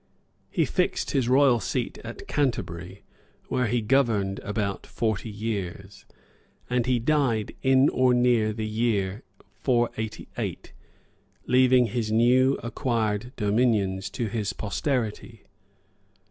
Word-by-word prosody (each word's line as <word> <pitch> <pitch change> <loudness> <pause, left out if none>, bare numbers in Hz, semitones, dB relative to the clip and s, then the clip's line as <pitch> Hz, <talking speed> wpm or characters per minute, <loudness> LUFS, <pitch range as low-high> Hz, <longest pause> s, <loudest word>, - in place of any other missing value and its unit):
He - - +1
fixed - - -1
his 125 -3 +1
royal 130 -2 +5
seat - - -3
at - - -9
Canterbury, 95 - -2 0.5
where 125 -2 +1
he 120 +2 0
governed 105 -6 +1
about 105 -2 -3
forty 110 -1 -2
years, 100 -2 -5 0.6
and 125 -1 0
he 125 -1 +3
died 120 -4 +1
in 130 +1 +4
or 130 0 +3
near 120 -3 +3
the 110 0 -4
year 110 -2 -1 0.4
488, 120 -4 -2 0.7
leaving 130 -1 +4
his 115 -1 -2
new 125 +4 +4
acquired 115 -1 -1
dominions 100 -3 +1
to 115 - -3
his 105 -2 -2
posterity. 110 0 -3
115 Hz, 110 wpm, -26 LUFS, 105-125 Hz, 0.7 s, royal